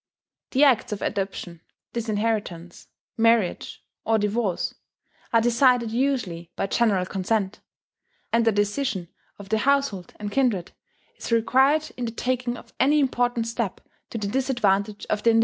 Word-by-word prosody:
The 275 +2 +3
acts 250 -4 +4
of 205 - -4
adoption, 190 -4 -3 0.3
disinheritance, 210 -6 -2 0.3
marriage, 230 -4 +1 0.2
or 225 - +2
divorce, 210 -2 -1 0.6
are 230 - +4
decided 240 0 +3
usually 230 -10 -1
by - - -1
general 195 -3 +2
consent; 195 +1 -1 0.7
and 230 0 +4
the 225 - +4
decision 205 -2 -1 0.3
of 200 -1 -11
the 220 - +2
household 275 -8 0
and 205 -1 -4
kindred 230 -10 +1 0.5
is - - -7
required 265 +7 +3
in 245 - -2
the 230 - -3
taking 245 +1 -2
of 235 - -15
any 295 +3 +4
important 245 -4 +1
step 230 -4 -3 0.3
to - - -5
the 210 - -3
disadvantage 210 -5 0
of 210 - -1
the 230 - +4
individual. 225 0 +5
225 Hz, 145 wpm, -25 LUFS, 200-245 Hz, 0.7 s, individual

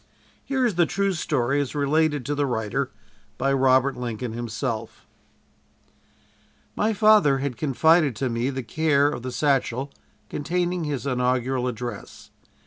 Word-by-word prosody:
Here 265 -2 0
is 235 - +1
the 170 - +4
true 200 0 0
story, 145 -4 0
as 140 0 -5
related 150 -1 +1
to 145 - -1
the 145 -1 0
writer 110 -4 -2 0.5
by 135 0 +1
Robert 130 0 +3
Lincoln 120 -1 -4
himself: 115 -1 -4 1.7
"My 215 - +1
father 210 -10 +5
had 135 -2 -3
confided 150 +2 +3
to 130 +5 -1
me 120 +2 -1
the 135 -1 -4
care 145 +1 +2
of 145 - -5
the 130 +1 -5
satchel 135 -1 0 0.4
containing 175 +2 -2
his 145 -3 -3
inaugural 125 -1 0
address. 120 -3 -7
135 Hz, 135 wpm, -24 LUFS, 125-155 Hz, 1.7 s, father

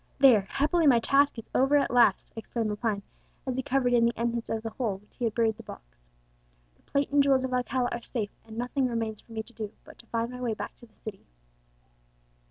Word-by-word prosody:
There! 240 -8 +6
happily 310 +3 +2
my 255 -4 +7
task 280 +3 +3
is 230 - -8
over 270 +3 +4
at 280 - +1
last!" 235 -5 +4
exclaimed 225 -1 -2
Lepine, 210 -1 -1 0.4
as 260 -2 -2
he 260 - 0
covered 250 -1 +1
in 235 -1 +5
the 235 0 +2
entrance 235 0 -1
of 225 0 -2
the 225 - -4
hole 220 -4 -1
in 190 - -13
which 210 - -28
he 245 - 0
had 225 - -1
buried 225 -2 +2
the - - -9
box. - - -13 0.7
"The - - -31
plate 280 0 -1
and 285 0 +5
jewels 270 -2 +3
of 255 - -4
Alcala 250 0 0
are 240 - -3
safe, 220 -4 -3
and 220 0 -11
nothing 250 +2 0
remains 225 -3 -3
for - - -21
me 220 -1 -3
to 235 - -17
do 215 -2 -5
but - - -15
to 230 - -15
find 230 +1 -2
my 250 0 -7
way 235 -3 -1
back - - -6
to 240 - -15
the 220 - -31
city." 210 -3 -8
235 Hz, 240 wpm, -28 LUFS, 220-260 Hz, 0.7 s, my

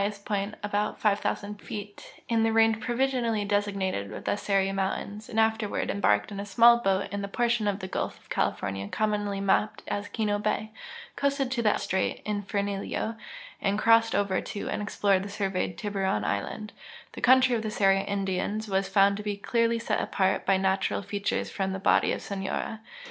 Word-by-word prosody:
st 200 0 -3
point 205 0 -2
(about 205 0 -1
5,000 205 0 -1
feet) 205 -1 -9
in 230 -1 +2
the 225 0 +3
range 225 0 +4
provisionally 240 -3 0
desig 205 0 0
nated 185 - -3
the - - +1
Seri 195 -1 +1
mountains, 195 +2 -3
and 225 - -1
afterward 220 -1 +1
embarked 105 - +2
in 200 - -5
a 200 - -4
small 235 +4 +6
boat 195 -3 +1
in 200 0 -3
that 200 0 -6
])ortion 235 -3 +1
of 195 - -1
the 185 - -4
gulf - - -3
of - - -24
California 100 0 -1
commonly 205 - -1
map])ed 200 +2 +1
as 205 0 -3
Kino 205 -1 -1
bay, 215 +1 -1 0.4
coasted 280 -2 0
to 250 -2 0
the 210 -2 +3
strait 190 0 -1
El 210 -1 -1
Infiernillo, 200 +2 -2 0.5
and 200 0 +1
crossed 225 +1 +4
over 200 -2 +1
to 205 - -5
an<l - - -2
ex|)l(^red 200 -1 +2
and 195 +2 -5
surveyed 195 -3 -2
Tiburon 195 - -1
island, 155 - -3 0.4
ddie - - -8
country 255 0 +5
of 225 - -1
the 220 - -3
Seri 195 -2 +3
Indians 200 +2 -2
was 195 -1 0
found 200 0 +4
to - - -5
be 205 -1 -2
clearly 230 +2 +1
set 230 - -1
apart 190 -1 0
by 195 0 +4
natural 190 +1 0
features 200 +1 -2
from 190 -1 -2
the - - -2
body - - +3
of - - -3
Sonora. 200 +2 -3
205 Hz, 185 wpm, -27 LUFS, 195-220 Hz, 0.5 s, small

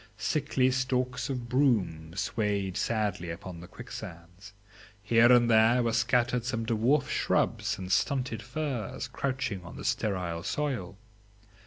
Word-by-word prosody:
Sickly 130 0 +1
stalks 130 -1 -1
of 125 -3 -3
broom 100 - +1
swayed 100 -2 -1
sadly 105 -6 -1
upon 85 +1 -7
the 90 - -10
quicksands; 90 +6 -10 0.5
here 115 +3 +5
and 120 -1 +6
there 115 +2 +5
were 115 -1 0
scattered 120 +1 +2
some 115 -2 -2
dwarf 120 +5 +2
shrubs - - 0
and 95 -1 -6
stunted 125 -1 0
firs 125 -2 -4
crouching 130 -8 -3
on 90 - -10
the - - -8
sterile 90 -5 -1
soil. 120 - -3
115 Hz, 130 wpm, -29 LUFS, 95-125 Hz, 0.5 s, and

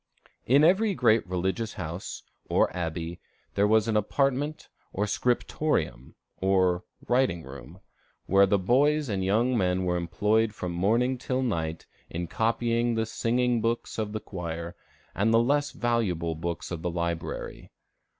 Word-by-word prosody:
In 140 +5 +5
every 195 +5 +4
great 115 - +3
religious 95 +4 -2
house, 85 +4 -6 0.3
or - - +2
abbey, 85 -1 -4 0.3
there 100 +1 +3
was 110 +1 +3
an 110 - 0
apartment 140 +7 0 0.2
called 100 - -1
the - - 0
scriptorium, 120 - -1 0.2
or 95 -2 +2 0.2
writing 120 -10 +2
room, 70 +7 -11 0.4
where 100 +1 +5
boys 130 +9 +2
and 95 -2 -1
young 115 +7 +2
men 90 -3 +1
were 90 0 +1
employed 105 +6 +1
from 90 - -4
morning 115 +9 +1
till 130 0 -1
night 80 -9 -2 0.2
in 85 +1 -3
copying 115 +4 0
the 110 0 0
singing 120 +1 0
books 115 0 -2
of 105 -1 -2
the 110 - -3
choir, 85 -3 -6 0.4
and 105 +3 +1
the 115 - +5
less 145 +4 +2
valuable 95 -9 -1
books 85 +2 -4
of 85 -2 -4
the 90 - -1
library. 85 -1 -4
105 Hz, 145 wpm, -27 LUFS, 85-120 Hz, 0.4 s, In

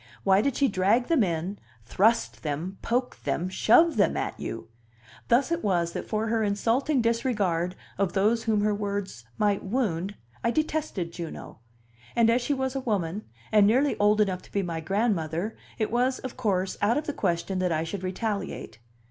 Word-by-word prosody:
Why 195 0 +5
did 275 +2 0
she 280 - +3
drag 205 +5 +2
them 325 -6 +4
in, 175 +2 -2 0.3
thrust 120 - +2
them, 160 +8 -4
poke 250 +2 -1
them, 180 +2 -1
shove 290 - +4
them 205 - +3
at - - -3
you? - - -5 0.6
Thus 255 +6 +3
it 335 0 -1
was 175 -4 +1
that - - -5
for 215 0 -1
her 225 0 0
insulting 235 +6 +1
disregard 205 -7 0 0.2
of 195 -3 +1
those 215 +4 +2
whom 215 -2 +2
her 210 0 +2
words 200 - -4
might 205 -2 +2
wound 200 -4 -1 0.3
I 230 - +2
detested 300 - -1
Juno; 170 -9 -7 0.6
and 230 -1 +5
as 245 +2 +2
she 285 +4 0
was 265 0 -2
a - - 0
woman, 205 -6 -2 0.3
and 210 -2 +6
nearly 265 +6 +3
old 210 +1 +4
enough 190 -3 +1
to - - -19
be 200 - 0
my 170 -2 -3
grandmother, 190 0 -1 0.2
it 215 -2 -1
was, 250 +2 +1
of 260 - -7
course, 195 -6 -1
out 220 +5 +3
of 300 - -2
the 295 - -3
question 185 -1 -1
that 180 -1 +1
I 160 0 +1
should 180 +4 -5
retaliate. 190 - -4
205 Hz, 180 wpm, -27 LUFS, 185-235 Hz, 0.6 s, and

